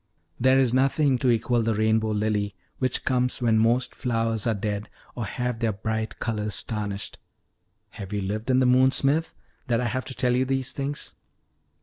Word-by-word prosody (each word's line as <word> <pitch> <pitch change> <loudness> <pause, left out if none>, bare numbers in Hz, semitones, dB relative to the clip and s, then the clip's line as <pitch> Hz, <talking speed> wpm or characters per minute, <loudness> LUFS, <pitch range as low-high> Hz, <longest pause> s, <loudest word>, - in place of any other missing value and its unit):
"There 130 +2 +4
is 130 -3 +3
nothing 135 0 +2
to 130 - +2
equal 120 +1 +2
the 115 -1 0
rainbow 110 +1 +2
lily, 105 -1 -1 0.2
which 130 -1 0
comes 125 -1 +1
when 115 -3 +3
most 120 +3 +2
flowers 115 -2 -1
are 115 - +2
dead, 105 0 -3 0.2
or 120 - -4
have 125 +3 -3
their 115 -2 0
bright 110 +2 -3
colors 105 -3 -3
tarnished. 105 -2 -4 0.7
Have 100 -3 -8
you 105 -1 -1
lived 105 +5 -3
in 130 - +4
the 130 - +4
moon, 130 +1 +5
Smith, 145 +4 +1 0.3
that 120 -2 +2
I 125 - -1
have 130 +2 -2
to 130 - -6
tell 125 -1 +1
you 130 - +2
these 130 -1 -1
things?" 140 +1 -4
115 Hz, 185 wpm, -25 LUFS, 110-130 Hz, 0.7 s, moon